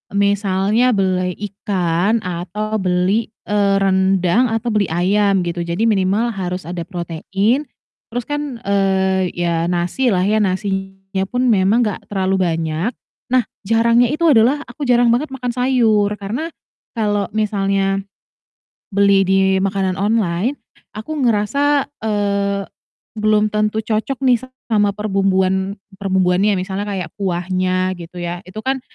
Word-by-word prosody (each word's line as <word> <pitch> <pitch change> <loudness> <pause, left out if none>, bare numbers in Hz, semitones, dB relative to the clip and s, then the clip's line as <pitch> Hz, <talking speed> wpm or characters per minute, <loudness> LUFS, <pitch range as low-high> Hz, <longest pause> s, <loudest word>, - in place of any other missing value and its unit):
misalnya 200 +3 +2
beli 185 -2 0 0.2
ikan 195 +1 0
atau 190 +5 -3
beli, 185 +4 +1 0.2
eee, 200 -1 +2
rendang 190 +3 +2
atau 225 +1 -1
beli 205 -3 +2
ayam 195 +3 +2
gitu, 170 0 -3
jadi 170 +4 -3
minimal 210 +2 +1
harus 180 -2 -4
ada 175 0 -4
protein 195 - -1 0.4
terus 245 +2 -4
kan, 290 -5 -4
eee, 190 -2 +1
ya 170 -1 0
nasi 180 +9 0
lah 180 - +2
ya, 210 +3 +2
nasinya 195 0 -2
pun 250 +3 0
memang 205 +4 +3
gak 210 - -4
terlalu 190 -1 0
banyak. 165 +5 -1 0.4
Nah 255 0 +3 0.2
jarangnya 230 +3 +4
itu 305 +5 -2
adalah 265 +2 +4
aku 295 - -6
jarang 240 -1 +4
banget 280 +5 0
makan 250 -2 -3
sayur 235 -5 +2
karena 220 +11 -4 0.5
kalau 205 -2 0
misalnya 195 -2 +1 0.9
beli 200 0 +4
di 190 +1 +2 0.2
makanan 195 -1 0
online, 210 +3 0 0.4
aku 220 +9 -5
ngerasa, 270 +5 +2 0.2
eee, 200 -2 0 0.6
belum 215 0 +2
tentu 215 +1 +1
cocok 225 +5 -1
nih 245 -3 +4 0.3
sama 210 -2 +3
perbumbuan 195 -1 0 0.2
perumbuannya, 190 +1 +2
misalnya 190 +2 -3
kayak 190 -5 -4
kuahnya 185 0 0
gitu 170 +1 -10
ya, 175 0 -4
itu 185 +4 -13
kan 265 0 0
200 Hz, 130 wpm, -19 LUFS, 185-220 Hz, 0.9 s, jarangnya